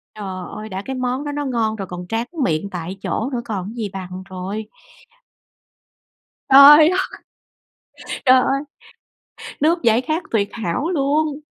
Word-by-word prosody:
Trời 190 -3 -6
ơi, 215 +1 -7
đã 190 -1 -5
cái 265 - -4
món 255 +2 -2
đó 290 - -4
nó 290 0 -3
ngon 230 -4 0
rồi 195 -3 -6
còn 180 0 -7
tráng 225 +4 -2 0.2
miệng 165 0 -1
tại 180 +1 -6
chỗ 230 - -2
nữa 240 - -1
còn 200 -4 -3
cái 220 - -7
gì 220 -4 -3
bằng 185 -1 -7
trời! 190 +4 -5 1.9
Trời 295 +3 +10
ơi, - - 0 1.3
trời 255 0 +7
ơi! 275 +2 0 1.0
Nước 335 +1 +2
giải 230 +1 +4
khát 315 +5 -2
tuyệt 205 -3 +1
hảo 225 - -2
luôn! 300 -2 0
225 Hz, 155 wpm, -20 LUFS, 190-275 Hz, 1.9 s, Trời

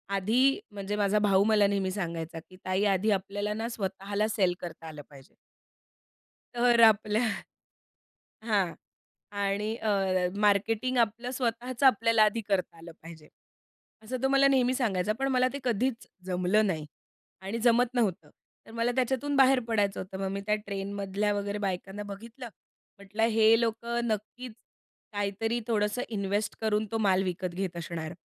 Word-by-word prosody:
आधी 245 +8 +2
म्हणजे 205 0 -4
माझा 205 0 +2
भाऊ 200 -1 +4
मला 210 -2 +4
नेहमी 195 -2 -1
सांगायचा 165 -4 -4
की 185 - -15
ताई 185 +2 0
आधी 200 +2 +2
आपल्याला 205 +2 -2
ना 225 +2 -3
स्वतःला 200 0 -2
सेल 190 -5 +1
करता 165 -2 -8
आलं 150 -2 -8
पाहिजे. 135 -2 -16 1.2
तर 240 -1 +3
आपल्या 215 +1 +2 1.3
हां 195 -7 +1 0.7
आणि 205 +2 -1
अ, 220 -2 -3 0.5
मार्केटिंग 215 +5 +1
आपलं 235 +2 0
स्वतःचं 245 +1 -2
आपल्याला 230 -2 +5
आधी 215 +2 +1
करता 185 -4 -1
आलं 170 +1 -11
पाहिजे, 160 -2 -12 0.8
असं 255 +4 -4
तो - - +4
मला 275 0 +5
नेहमी 255 -2 +3
सांगायचा, 215 -6 0
पण 270 - +1
मला 255 0 +3
ते 280 - -4
कधीच 240 0 -1 0.2
जमलं 185 +3 +2
नाही 155 -5 -2 0.6
आणि 195 +4 -4
जमत 240 +1 +3
नव्हतं. 190 -11 -1 0.4
तर - - -14
मला 230 +1 0
त्याच्यातून 265 +3 0
बाहेर 265 -1 +5
पडायचं 205 -3 0
होतं, 190 0 -7
मग 195 - -1
मी 200 - -3
त्या 210 - +3
ट्रेनमधल्या 200 +1 -2
वगैरे 205 0 -2
बायकांना 195 +1 -4
बघितलं, 230 +5 -9 0.5
म्हटलं 200 +3 -3
हे 225 +1 +5
लोकं 235 +1 -1
नक्कीच 220 +3 -4 0.6
काहीतरी 210 +3 -1
थोडंसं 210 +1 0
इन्वेस्ट 205 0 -2
करून 215 0 +1
तो 225 - 0
माल 195 -3 +2
विकत 180 -1 -3
घेत 185 -1 -3
असणार 165 -1 -5
210 Hz, 150 wpm, -28 LUFS, 195-230 Hz, 1.3 s, आपल्याला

